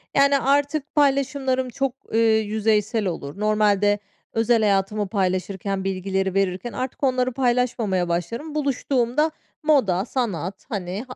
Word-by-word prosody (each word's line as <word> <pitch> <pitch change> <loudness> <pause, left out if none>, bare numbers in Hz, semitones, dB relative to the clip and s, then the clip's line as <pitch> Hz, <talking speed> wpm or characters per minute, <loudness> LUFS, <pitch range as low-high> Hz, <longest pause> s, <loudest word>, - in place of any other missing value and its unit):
Yani, 280 0 +5
artık 285 +3 0
paylaşımlarım 270 -2 +1
çok, 270 +1 -2 0.2
ııı, 225 - +2 0.2
yüzeysel 215 0 0
olur. 165 0 -5
Normalde 205 -1 +2 0.3
özel 225 0 +3
hayatımı 205 0 +1
paylaşırken, 190 0 -1
bilgileri 190 0 -1
verirken 195 +3 -1
artık 255 +2 -5
onları 255 -1 +2
paylaşmamaya 240 -8 0
başlarım. 230 - -3
Buluştuğumda 275 0 +1 0.3
moda, 225 - +3
sanat, 195 - -3
hani, 195 -1 -4
ha 255 - -9
220 Hz, 120 wpm, -23 LUFS, 195-260 Hz, 0.3 s, Yani